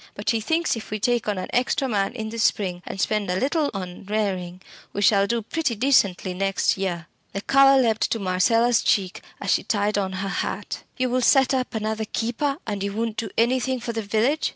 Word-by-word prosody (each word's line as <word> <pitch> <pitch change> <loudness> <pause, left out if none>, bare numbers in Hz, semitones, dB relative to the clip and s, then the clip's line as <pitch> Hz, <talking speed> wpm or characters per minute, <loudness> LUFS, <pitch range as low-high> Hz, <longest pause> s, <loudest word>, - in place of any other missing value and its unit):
But 205 - -1
he 225 -1 0
thinks 325 +7 0
if 225 - -8
we 215 - -3
take 240 0 0
on 205 -2 -1
an 185 - -3
extra 255 +2 +1
man 205 -2 0
in 220 -3 -5
the 230 +1 -6
spring, 185 -5 +1
and 195 - -6
spend 210 0 0
a 180 +1 0
little 290 +2 +1
on 185 -3 -7
rearing, 190 -4 -2 0.3
we 205 - -1
shall 200 -1 +4
do 235 +1 -1
pretty 295 +1 -1
decently 200 -7 +2
next 195 +1 +1
year." 180 -4 -3 0.3
The 195 - -3
colour 275 +2 +5
leapt 225 -4 +2
to - - 0
Marcella's 225 +5 +2
cheek 190 -3 0 0.2
as - - -1
she - - +3
tied 205 -1 0
on 190 -1 -2
her 190 +1 -3
hat. - - -3 0.2
"You 255 -1 0
will 255 +1 +1
set 270 +2 +4
up 255 -3 -1
another 220 0 -2
keeper, 240 +6 -2
and 205 -3 -3
you 200 0 -2
won't 225 0 -2
do 230 - -3
anything 255 +2 +1
for 235 0 -4
the 225 - -2
village?" 225 +9 +1
220 Hz, 215 wpm, -24 LUFS, 195-245 Hz, 0.3 s, colour